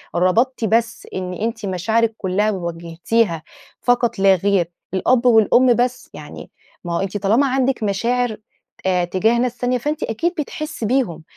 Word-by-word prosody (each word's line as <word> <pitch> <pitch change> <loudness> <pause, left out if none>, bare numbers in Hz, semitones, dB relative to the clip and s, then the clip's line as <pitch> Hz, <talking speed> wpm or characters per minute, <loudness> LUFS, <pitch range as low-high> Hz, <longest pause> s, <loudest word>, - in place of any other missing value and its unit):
ربطتِ 225 +8 +1
بس 230 +2 0
إن 185 -1 -4
أنتِ 225 +3 -3
مشاعرك 220 +5 0
كلها 205 +3 0
وجهتيها 170 +1 -2 0.4
فقط 240 -2 +1
لا 195 0 +5
غير 190 -2 +1 0.2
الأب 240 +6 +2
والأم 240 +2 +5
بس، 250 +1 -1
يعني - - -10 0.3
ما 175 -1 -4
هو - - 0
أنتِ 195 +1 -2
طالما 215 +8 +2
عندك 260 -2 0
مشاعر 230 +3 0 0.5
آآ، 180 -2 +2
تجاه 210 +7 +1
ناس 250 0 -1
تانية 250 0 0
فأنتِ 295 +5 -3
أكيد 330 - -1
بتحسي 305 -2 -4
بيهم، 215 -9 0
220 Hz, 150 wpm, -20 LUFS, 185-245 Hz, 0.5 s, لا